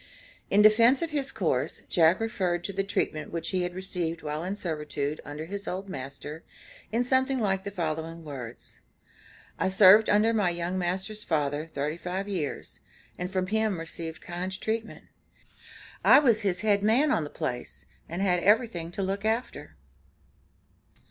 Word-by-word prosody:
In 205 Hz, +1 st, +5 dB
defense 230 Hz, +6 st, +6 dB
of 330 Hz, -, -3 dB
his 280 Hz, -3 st, -1 dB
course, -, -, -1 dB
Jack 165 Hz, 0 st, +4 dB
referred 185 Hz, -6 st, -1 dB
to 200 Hz, -, -4 dB
the 195 Hz, +1 st, 0 dB
treatment 195 Hz, -6 st, -2 dB
which 165 Hz, -1 st, -3 dB
he 185 Hz, -, 0 dB
had 180 Hz, 0 st, -3 dB
received 175 Hz, -4 st, -3 dB
while 150 Hz, +1 st, -3 dB
in 190 Hz, +3 st, -3 dB
servitude 150 Hz, -5 st, -3 dB
under 145 Hz, +2 st, -6 dB
his 200 Hz, +3 st, -6 dB
old 190 Hz, +2 st, -4 dB
master, 140 Hz, +2 st, -7 dB, 0.5 s
in 230 Hz, +3 st, +1 dB
something 260 Hz, +1 st, +2 dB
like 195 Hz, -5 st, 0 dB
the 200 Hz, -, -4 dB
following 165 Hz, -3 st, -4 dB
words: 130 Hz, -6 st, -9 dB, 0.8 s
"I -, -, +2 dB
served 195 Hz, +3 st, +7 dB
under 215 Hz, +2 st, +4 dB
my 205 Hz, -5 st, +2 dB
young 175 Hz, +2 st, -2 dB
master's 190 Hz, +4 st, -2 dB
father, 150 Hz, 0 st, -1 dB
thirty 150 Hz, +3 st, -2 dB
five 185 Hz, +3 st, -4 dB
years, 175 Hz, -8 st, -4 dB, 0.4 s
and 180 Hz, 0 st, -3 dB
from 185 Hz, -1 st, 0 dB
him 215 Hz, 0 st, 0 dB
received 165 Hz, 0 st, -6 dB
kind 185 Hz, +2 st, -5 dB
treatment. 225 Hz, 0 st, -3 dB, 1.0 s
I -, -, +8 dB
was 235 Hz, -7 st, +4 dB
his 190 Hz, -3 st, 0 dB
head 205 Hz, -2 st, +3 dB
man 245 Hz, +8 st, +3 dB
on 165 Hz, -, +2 dB
the 145 Hz, -, -6 dB
place, 125 Hz, -3 st, -5 dB, 0.2 s
and 175 Hz, +4 st, -2 dB
had 180 Hz, -3 st, +2 dB
everything 205 Hz, -5 st, +2 dB
to 195 Hz, -, -2 dB
look 195 Hz, +1 st, -2 dB
after." 225 Hz, +3 st, -2 dB
185 Hz, 160 wpm, -27 LUFS, 165-210 Hz, 1.0 s, I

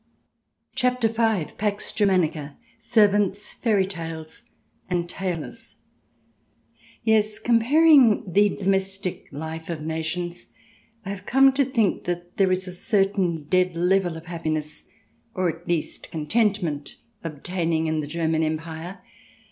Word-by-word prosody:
CHAPTER 250 Hz, -2 st, +1 dB
V 225 Hz, -7 st, 0 dB
PAX 205 Hz, 0 st, -2 dB
GERMANICA: 165 Hz, -8 st, +1 dB, 0.2 s
SERVANTS, 205 Hz, -3 st, +2 dB
FAIRY 210 Hz, -5 st, +1 dB
TALES, 165 Hz, -4 st, -8 dB, 0.4 s
AND 175 Hz, -1 st, 0 dB
TAILORS 170 Hz, -8 st, -5 dB, 1.3 s
Yes, 215 Hz, -1 st, +2 dB
comparing 250 Hz, 0 st, +5 dB
the 205 Hz, +1 st, +5 dB
domestic 195 Hz, -1 st, -2 dB
life 160 Hz, +3 st, -6 dB
of 160 Hz, -3 st, -4 dB
nations, 165 Hz, +2 st, -3 dB, 0.6 s
I -, -, -5 dB
have 200 Hz, -1 st, -6 dB
come 270 Hz, +1 st, +5 dB
to 275 Hz, +1 st, +3 dB
think 240 Hz, -6 st, 0 dB
that 175 Hz, 0 st, -4 dB
there 190 Hz, -2 st, +3 dB
is 185 Hz, +1 st, -1 dB
a 180 Hz, -, -6 dB
certain 195 Hz, -4 st, +1 dB
dead 180 Hz, +3 st, +1 dB
level 175 Hz, 0 st, +1 dB
of 160 Hz, -, -11 dB
happiness, 155 Hz, -3 st, -4 dB, 0.5 s
or 185 Hz, -1 st, +1 dB
at 170 Hz, +1 st, -20 dB
least 170 Hz, -3 st, -2 dB
contentment, 170 Hz, -3 st, -1 dB, 0.3 s
obtaining 165 Hz, +1 st, -2 dB
in 155 Hz, 0 st, 0 dB
the 150 Hz, -, -3 dB
German 160 Hz, 0 st, 0 dB
Empire. 160 Hz, +3 st, -4 dB
180 Hz, 120 wpm, -24 LUFS, 160-205 Hz, 1.3 s, comparing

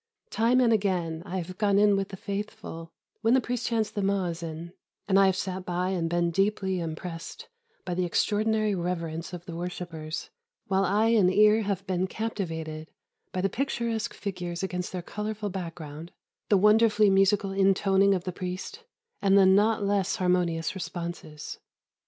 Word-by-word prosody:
Time 235 Hz, +3 st, +3 dB
and 240 Hz, -3 st, +4 dB
again 180 Hz, -6 st, 0 dB
I 190 Hz, -, -3 dB
have 185 Hz, +1 st, -6 dB
gone 200 Hz, -2 st, +3 dB
in 205 Hz, 0 st, +5 dB
with 195 Hz, 0 st, -1 dB
the 190 Hz, -, -8 dB
Faithful, 195 Hz, -5 st, -6 dB, 0.3 s
when 225 Hz, +3 st, +4 dB
the -, -, +5 dB
priest 245 Hz, -1 st, -2 dB
chants 225 Hz, -2 st, 0 dB
the 205 Hz, -, -3 dB
mu'azzin, 170 Hz, -4 st, -2 dB, 0.3 s
and 195 Hz, -1 st, +4 dB
I 195 Hz, -, +6 dB
have 190 Hz, -, +2 dB
sat 185 Hz, 0 st, -3 dB
by 180 Hz, +1 st, -1 dB
and 175 Hz, -3 st, -1 dB
been 175 Hz, 0 st, +1 dB
deeply 195 Hz, 0 st, 0 dB
impressed 165 Hz, +1 st, -6 dB, 0.4 s
by 180 Hz, -, -2 dB
the 180 Hz, +1 st, 0 dB
extraordinary 215 Hz, +4 st, +1 dB
reverence 170 Hz, -2 st, -3 dB
of 175 Hz, -1 st, -8 dB
the 170 Hz, -4 st, -7 dB
worshippers, 170 Hz, -2 st, -5 dB, 0.3 s
while 195 Hz, 0 st, +1 dB
eye 210 Hz, +4 st, +2 dB
and 205 Hz, -6 st, +4 dB
ear 210 Hz, +2 st, +5 dB
have 200 Hz, -2 st, -2 dB
been 185 Hz, -1 st, 0 dB
captivated 165 Hz, -8 st, -4 dB, 0.4 s
by 185 Hz, -, -2 dB
the 195 Hz, -, +2 dB
picturesque 235 Hz, -1 st, -2 dB
figures 180 Hz, -3 st, -4 dB
against 180 Hz, -1 st, -3 dB
their 180 Hz, -2 st, -4 dB
colourful 210 Hz, +1 st, -4 dB
background, 165 Hz, -3 st, -7 dB, 0.4 s
the 205 Hz, -, +5 dB
wonderfully 210 Hz, 0 st, +5 dB
musical 195 Hz, +1 st, +3 dB
intoning 195 Hz, 0 st, +3 dB
of 180 Hz, -, -3 dB
the 185 Hz, -, -3 dB
priest, 185 Hz, -, -6 dB, 0.4 s
and 195 Hz, -1 st, +4 dB
the 195 Hz, -, +7 dB
not 205 Hz, +3 st, +4 dB
less 200 Hz, -1 st, +1 dB
harmonious 180 Hz, -3 st, +1 dB
responses. 170 Hz, -5 st, -6 dB
190 Hz, 165 wpm, -27 LUFS, 175-205 Hz, 0.4 s, the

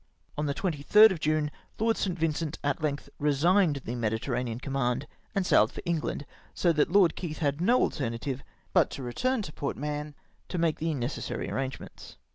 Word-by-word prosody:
On 150 Hz, 0 st, -1 dB
the 140 Hz, -, -1 dB
23rd 195 Hz, +5 st, +5 dB
of 180 Hz, -, -3 dB
June, 155 Hz, -1 st, +1 dB, 0.3 s
Lord 225 Hz, +1 st, +2 dB
St. 185 Hz, -3 st, -1 dB
Vincent 160 Hz, -1 st, -1 dB
at 145 Hz, +2 st, 0 dB
length 145 Hz, -2 st, -2 dB
resigned 150 Hz, +1 st, +3 dB
the 120 Hz, -, -3 dB
Mediterranean 115 Hz, +1 st, -2 dB
com 140 Hz, +1 st, -6 dB
mand 125 Hz, 0 st, 0 dB, 0.3 s
and 195 Hz, -2 st, +1 dB
sailed -, -, +4 dB
for -, -, -8 dB
England, 160 Hz, -3 st, -2 dB, 0.3 s
so 170 Hz, -2 st, +3 dB
that 150 Hz, +1 st, +2 dB
Lord 190 Hz, -3 st, +5 dB
Keith 160 Hz, -4 st, -5 dB
had 145 Hz, 0 st, 0 dB
no 240 Hz, +7 st, +4 dB
alternative 130 Hz, 0 st, -2 dB, 0.3 s
but -, -, +4 dB
to 135 Hz, -, -7 dB
return 240 Hz, -, 0 dB
to 150 Hz, -, -7 dB
Port 140 Hz, -, -3 dB
j\Ialion 150 Hz, +1 st, -4 dB, 0.3 s
to 180 Hz, -, -3 dB
make 165 Hz, -2 st, +1 dB
the 160 Hz, -1 st, -1 dB
necessary 125 Hz, +1 st, -3 dB
arrangements. 135 Hz, -1 st, -5 dB
150 Hz, 180 wpm, -28 LUFS, 135-170 Hz, 0.3 s, 23rd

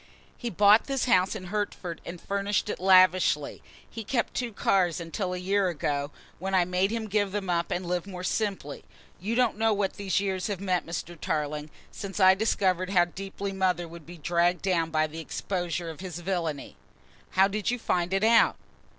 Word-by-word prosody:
He 240 Hz, -, -4 dB
bought 205 Hz, +2 st, +5 dB
this 270 Hz, -2 st, -1 dB
house 205 Hz, -5 st, +3 dB
at 205 Hz, -, -6 dB
Hertford 185 Hz, -3 st, -4 dB
and 175 Hz, 0 st, -7 dB
furnished 200 Hz, +2 st, -1 dB
it -, -, -3 dB
lavishly, 185 Hz, -5 st, +4 dB, 0.3 s
he 225 Hz, -, -7 dB
kept 235 Hz, +2 st, -1 dB
two 245 Hz, -2 st, -2 dB
cars 185 Hz, -5 st, +1 dB
until 180 Hz, +3 st, -3 dB
a 180 Hz, -, -3 dB
year 195 Hz, +2 st, +1 dB
ago, 145 Hz, -3 st, -2 dB, 0.3 s
when 190 Hz, +2 st, -1 dB
I 180 Hz, -2 st, +4 dB
made 180 Hz, +2 st, +1 dB
him 225 Hz, 0 st, -3 dB
give 205 Hz, -1 st, 0 dB
them 195 Hz, -2 st, -2 dB
up 170 Hz, 0 st, 0 dB
and 180 Hz, +1 st, -2 dB
live 180 Hz, +1 st, -2 dB
more 180 Hz, -2 st, -7 dB
simply. 190 Hz, -8 st, -2 dB, 0.4 s
You 215 Hz, +6 st, -2 dB
don't 245 Hz, -3 st, +2 dB
know 225 Hz, -1 st, +3 dB
what 200 Hz, -2 st, -1 dB
these 195 Hz, -2 st, 0 dB
years 190 Hz, -2 st, -2 dB
have 200 Hz, -4 st, -3 dB
meant, 185 Hz, -3 st, -1 dB
Mr. 170 Hz, +1 st, -5 dB
Tarling, 150 Hz, -1 st, -2 dB, 0.2 s
since 200 Hz, 0 st, -6 dB
I 190 Hz, -1 st, +7 dB
discovered 190 Hz, -3 st, +1 dB
how 180 Hz, -3 st, +4 dB
deeply 195 Hz, +2 st, -6 dB
mother 185 Hz, -3 st, 0 dB
would 165 Hz, -1 st, -12 dB
be 175 Hz, +1 st, -10 dB
dragged 175 Hz, +2 st, +1 dB
down 170 Hz, -4 st, +1 dB
by 155 Hz, -1 st, +2 dB
the 155 Hz, +1 st, -7 dB
exposure 175 Hz, 0 st, -3 dB
of 155 Hz, -, -12 dB
his 180 Hz, -3 st, -6 dB
villainy." 170 Hz, -5 st, -3 dB, 0.6 s
"How 190 Hz, +1 st, +7 dB
did 205 Hz, 0 st, -2 dB
you 245 Hz, -, 0 dB
find 180 Hz, -6 st, -1 dB
it 195 Hz, +1 st, +1 dB
out?" 230 Hz, +1 st, +5 dB
185 Hz, 195 wpm, -27 LUFS, 175-200 Hz, 0.6 s, I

